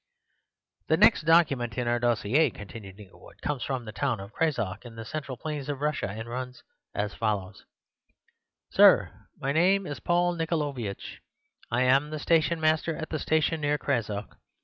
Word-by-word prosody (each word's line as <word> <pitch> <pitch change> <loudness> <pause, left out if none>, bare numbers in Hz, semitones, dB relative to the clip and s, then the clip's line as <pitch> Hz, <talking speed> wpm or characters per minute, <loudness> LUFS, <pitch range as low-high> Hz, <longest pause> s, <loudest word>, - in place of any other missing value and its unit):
"The 160 - +3
next 205 -4 +5
document 140 -9 +3
in 125 -1 -1
our 120 0 +1
dossier," 120 +5 +2
continued 105 -2 -10
Inglewood, 100 -3 -15
"comes 145 -4 -2
from 130 -2 -3
the 110 - -6
town 120 0 -1
of 100 +2 -9
Crazok, 115 - -1
in 120 -2 -11
the 115 0 -7
central 140 +1 -5
plains 150 0 -5
of 140 -2 -3
Russia, 150 0 -1
and 110 +3 -6
runs 125 +1 -6 0.3
as 105 0 -2
follows:— 105 -2 -3 1.1
"Sir,—My 135 - +3
name 185 +6 +3
is 145 -3 -5
Paul 175 0 +1
Nickolaiovitch: 145 - -3 0.5
I 120 +2 +1
am 135 +3 +3
the 155 - -4
stationmaster 160 0 +2
at 160 - -6
the 155 - -2
station 160 +1 +1
near 145 0 +1
Crazok. 110 -8 -3
135 Hz, 155 wpm, -27 LUFS, 115-155 Hz, 1.1 s, next